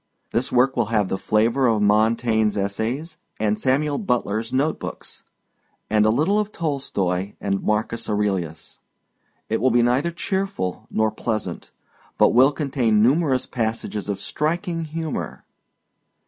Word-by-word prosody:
This 120 +3 -1
work 130 +2 +3
will 120 -3 +1
have 105 -4 +1
the 95 - -1
flavor 115 +5 +2
of 110 -2 +2
Montaigne's 110 +1 +2
essays 115 - -2 0.2
and 105 0 0
Samuel 145 +3 +1
Butler's 115 - -1
note 140 +5 0
books - - -8 0.7
and 105 0 +4
a - - +4
little 155 - +2
of 210 0 -2
Tolstoi 100 - -2
and 100 -1 -1
Marcus 110 +2 -1
Aurelius. 95 -7 -2 0.7
It 110 - -1
will 130 - +4
be 120 0 +3
neither 125 +7 +2
cheerful 185 - -3
nor 110 0 +1
pleasant 110 0 -4 0.5
but - - +5
will 130 +4 +6
contain 130 -7 +1
numerous 135 +1 +2
passages 110 -3 -3
of 100 -1 -2
striking 165 - -2
humor. 160 -1 -5
115 Hz, 135 wpm, -23 LUFS, 105-145 Hz, 0.7 s, will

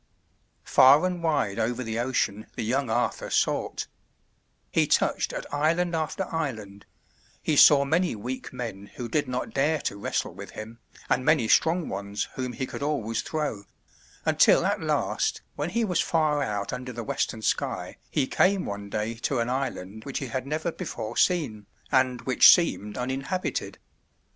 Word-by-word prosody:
Far 140 +6 +6
and 180 -1 -2
wide 145 -11 0
over 120 +3 -1
the 115 0 -3
ocean 115 -4 -1
the - - -3
young 130 +3 0
Arthur - - -1
sought; - - 0 0.9
he - - +2
touched - - +1
at - - -5
island 165 +4 +1
after 160 +4 -2
island; 110 -11 -4 0.6
he 155 - +1
saw 140 -1 +7
many 165 +1 +1
weak 125 +5 -6
men 115 -6 -6
who 120 - -5
did 145 +4 0
not 125 0 -3
dare 150 +3 +2
to 100 - -3
wrestle 100 - -2
with - - -9
him, 110 +2 -8 0.3
and 130 - +1
many 145 -5 +3
strong 165 +7 +3
ones 100 +1 -3
whom 125 -1 -4
he 130 - -3
could - - -8
always 125 -7 -1
throw, 145 -11 -3 0.6
until - - +5
at - - 0
last - - -1
when 145 +3 -2
he 230 +4 0
was 180 -5 0
far 155 -3 +1
out 105 -5 -2
under 125 0 -5
the 120 -1 -6
western 110 +1 -2
sky, - - -1
he 140 - +1
came 190 +6 +2
one 100 0 -5
day 110 +2 -2
to 125 +3 -2
an 120 +1 0
island 110 -6 -4
which 140 - -4
he 135 - -3
had 130 +3 -3
never 160 +4 -2
before 120 - -6
seen 130 - +1 0.2
and 130 -3 +2
which 130 - +7
seemed 105 - +3
uninhabited. 135 +9 -3
130 Hz, 165 wpm, -26 LUFS, 110-155 Hz, 0.9 s, saw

